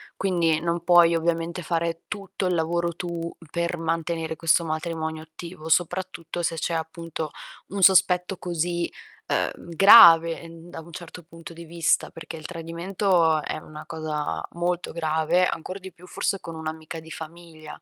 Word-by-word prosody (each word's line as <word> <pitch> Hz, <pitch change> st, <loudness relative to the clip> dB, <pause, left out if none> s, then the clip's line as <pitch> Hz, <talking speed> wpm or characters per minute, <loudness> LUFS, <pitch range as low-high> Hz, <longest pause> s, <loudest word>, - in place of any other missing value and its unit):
Quindi 170 Hz, -4 st, +1 dB
non 170 Hz, 0 st, -2 dB
puoi 170 Hz, -1 st, +6 dB
ovviamente 170 Hz, +1 st, -1 dB
fare 165 Hz, 0 st, -2 dB
tutto 200 Hz, -2 st, -5 dB
il 180 Hz, -, +1 dB
lavoro 170 Hz, +1 st, 0 dB
tu 170 Hz, -1 st, -5 dB, 0.2 s
per 170 Hz, +1 st, -2 dB
mantenere 165 Hz, 0 st, -2 dB
questo 165 Hz, +1 st, +3 dB
matrimonio 160 Hz, 0 st, -3 dB
attivo, 160 Hz, +1 st, -10 dB
soprattutto 175 Hz, 0 st, -1 dB
se 165 Hz, -, 0 dB
c'è 170 Hz, -, -2 dB
appunto 160 Hz, -1 st, -4 dB, 0.4 s
un 195 Hz, +1 st, -4 dB
sospetto 180 Hz, 0 st, +4 dB
così, 175 Hz, 0 st, -2 dB, 0.4 s
uhm, -, -, -2 dB
grave 170 Hz, -4 st, +8 dB, 0.2 s
da 165 Hz, -, -8 dB
un 170 Hz, +1 st, -14 dB
certo 175 Hz, +1 st, -10 dB
punto 165 Hz, 0 st, -12 dB
di 170 Hz, +1 st, -10 dB
vista, 165 Hz, 0 st, +1 dB
perché 165 Hz, 0 st, -9 dB
il 155 Hz, -, -11 dB
tradimento 170 Hz, -1 st, 0 dB
è -, -, -4 dB
una 155 Hz, 0 st, -10 dB
cosa 155 Hz, -2 st, -3 dB
molto 175 Hz, 0 st, -2 dB
grave, 160 Hz, +2 st, +1 dB
ancor 185 Hz, +4 st, -5 dB
di 190 Hz, 0 st, -10 dB
più 175 Hz, +1 st, -17 dB
forse 195 Hz, +1 st, -1 dB
con 165 Hz, -, -8 dB
un'amica 160 Hz, +1 st, -6 dB
di 160 Hz, 0 st, -13 dB
famiglia. 160 Hz, -1 st, -10 dB
170 Hz, 150 wpm, -25 LUFS, 160-175 Hz, 0.4 s, grave